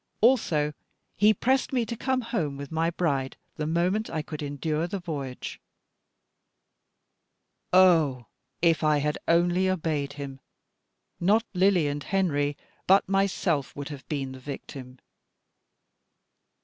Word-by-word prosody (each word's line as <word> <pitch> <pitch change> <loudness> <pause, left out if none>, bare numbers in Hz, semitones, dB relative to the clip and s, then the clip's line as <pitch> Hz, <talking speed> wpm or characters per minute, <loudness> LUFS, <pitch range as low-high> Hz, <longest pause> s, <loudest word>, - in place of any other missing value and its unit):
Also 170 - +3 0.4
he 210 +1 +5
pressed 260 +5 +1
me 250 -3 +1
to 235 - -4
come 260 +2 0
home 170 - -2
with 140 0 -8
my 165 +1 +1
bride 140 -6 -1 0.2
the 150 -1 -2
moment 180 +7 0
I 155 - -3
could 155 -1 -7
endure 150 +3 -2
the 200 - -3
voyage. 145 -8 -6 2.1
Ah! 165 -9 +5 0.4
if 165 -2 +3
I 155 -1 +4
had 150 +1 -1
only 175 +2 +3
obeyed 155 -6 -1
him, 140 -2 -7 0.8
not 210 +6 +3
Lily 185 -3 +3
and 145 0 -3
Henry, 145 -7 0 0.3
but 195 +2 +5
myself 190 -7 0
would 145 0 -6
have 145 -3 -9
been 135 -3 -2
the 130 - -9
victim. 130 -1 -8
160 Hz, 125 wpm, -27 LUFS, 145-190 Hz, 2.1 s, he